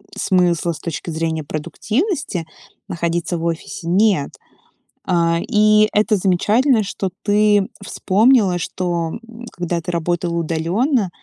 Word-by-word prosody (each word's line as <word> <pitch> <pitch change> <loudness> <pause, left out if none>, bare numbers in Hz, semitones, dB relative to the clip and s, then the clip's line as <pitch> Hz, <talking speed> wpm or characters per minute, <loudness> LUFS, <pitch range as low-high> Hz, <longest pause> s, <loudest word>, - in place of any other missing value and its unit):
смысла 175 -2 +1
с - - -10
точки 170 0 -5
зрения 160 -1 -2
продуктивности 190 - -2 0.4
находиться 170 0 -2
в 165 - -4
офисе 165 0 -4
нет. 190 -4 +2 0.8
А, 170 -2 +2
и 215 +1 +4
это 210 +1 +3
замечательно, 210 +6 +2
что 195 -1 -3
ты 205 -1 +3 0.2
вспомнила, 205 -1 +3
что 170 -1 -2 0.4
когда 175 -1 -3
ты 175 - -4
работала 170 0 -1
удаленно, 180 - 0
180 Hz, 110 wpm, -19 LUFS, 170-210 Hz, 0.8 s, и